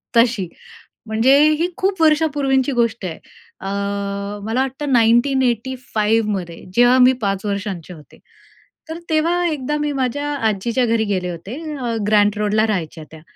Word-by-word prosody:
तशी. 230 -5 +3 0.6
म्हणजे 225 +5 +4 0.2
ही 340 - +2
खूप 380 -2 -1
वर्षापूर्वीची 290 -4 +2
गोष्ट 230 -3 0
आहे, 170 -3 -4 0.4
अ, 195 - -7 0.8
मला 225 +4 0
वाटतं 270 +2 -3
1985 240 -2 +1
मध्ये 175 -4 -5
जेव्हा 245 +1 +5
मी 255 +1 +6
5 195 -1 -2
वर्षांचे 200 -4 -4
होते. 155 -3 -16 0.7
तर 320 - -5
तेव्हा 335 +3 +1
एकदा 295 -2 -2
मी 295 0 -1
माझ्या 275 +2 -2 0.2
आजीच्या 230 +5 0
घरी 230 -1 +1
गेले 185 -3 -2
होते, 175 +7 -7 0.2
अ, 240 -3 -3
ग्रँट 210 -1 +3
रोडला 210 +1 +2
राहायच्या 165 -6 -3
त्या. 160 -1 -12
235 Hz, 140 wpm, -19 LUFS, 205-270 Hz, 0.8 s, मी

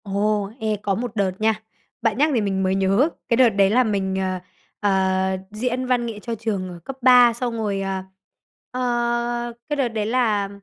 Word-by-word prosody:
Ồ! 205 0 0
Ê, 220 -1 0
có 200 -2 +1
một 235 +1 -4
đợt 200 -3 +1
nha, 220 0 +1 0.4
bạn 225 -2 +1
nhắc 300 +3 +3
thì 235 - +2
mình 195 -2 -1
mới 190 0 +1
nhớ, 195 - +3 0.2
cái 235 - +3
đợt 250 -2 +6
đấy 200 -2 +3
là 250 +5 +4
mình, 195 -4 -1
ờ, 185 -1 -1 0.4
ờ, 190 -1 +1
diễn 250 +4 -2
văn 250 -1 +1
nghệ 225 -3 -5
cho 230 +2 -4
trường 205 -4 -3
ở 175 -1 -9
cấp 270 - -7
ba, 245 -1 +7
xong 240 0 -3
rồi, 205 -3 -1
à, 190 -1 -3 0.7
ờ, 240 -1 -1 0.2
cái 295 - 0
đợt 275 -3 +1
đấy 220 -2 -2
là, 215 -4 +1
215 Hz, 200 wpm, -22 LUFS, 195-240 Hz, 0.7 s, ba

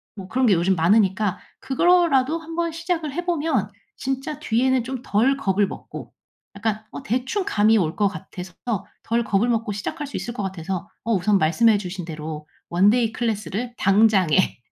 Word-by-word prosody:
뭐 195 -3 -8
그런 255 +4 +1
게 200 - +5
요즘 180 +2 +2
많으니까 190 +2 +2 0.2
그거로라도 325 -1 +3
한번 330 +1 -3
시작을 330 -3 -3
해 350 +4 -3
보면 300 - 0 0.3
진짜 270 +3 -3
뒤에는 260 -2 +1
좀 260 0 -5
덜 250 +7 +2
겁을 200 -5 +1
먹고 - - -9 0.4
약간 220 0 -2
어 - - -8
대충 260 - -1
감이 220 +1 +3
올 165 -5 0
것 205 -1 +2
같아서 180 -1 -8 0.5
덜 235 +1 0
겁을 220 +3 +1
먹고 225 -2 0
시작할 290 +9 -4
수 - - -5
있을 235 - -5
것 210 - -4
같아서 190 -1 -4
어 230 - 0
우선 200 +1 +3
말씀해 210 +8 +4
주신 180 -3 -6
대로 155 -1 -7 0.2
원데이 215 +6 +3
클래스를 225 +1 -3
당장에. 195 -5 +3
220 Hz, 330 characters per minute, -23 LUFS, 190-265 Hz, 0.5 s, 게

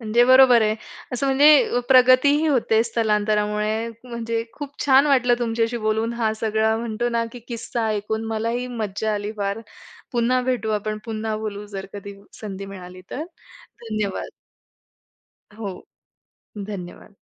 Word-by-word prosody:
म्हणजे 230 +2 +3
बरोबर 255 -2 +7
आहे. 215 0 +2 0.4
असं 250 +3 -1
म्हणजे 275 -2 +5
प्रगती 255 +1 +6
ही 315 +1 +1
होते 230 -6 +3
स्थलांतरामुळे. 215 0 0 0.2
म्हणजे 230 -2 -3
खूप 285 +1 -8
छान 275 +2 +6
वाटलं 250 -3 +4
तुमच्याशी 230 0 0
बोलून 220 +2 0
हा 225 -2 0
सगळा 220 0 +1
म्हणतो 230 +1 -2
ना, 230 -1 0
की 245 - -8
किस्सा 230 -1 -3
ऐकून. 220 +1 -2
मला 220 +1 -1
ही 250 - -4
मज्जा 220 -3 -3
आली 205 +1 -3
फार. 200 +2 -2 0.5
पुन्हा 245 +1 +2
भेटू 245 -4 -1
आपण. 215 +1 -4
पुन्हा 220 -1 -3
बोलू 210 -1 -5
जर 195 -2 -7
कधी 200 0 -8 0.3
संधी 195 -2 -6
मिळाली 185 -2 -10
तर. 300 +5 -4 0.6
धन्यवाद. 215 -3 -3 1.3
हो. 205 -4 -7 0.7
धन्यवाद. 200 -1 -8
225 Hz, 140 wpm, -22 LUFS, 210-245 Hz, 1.3 s, बरोबर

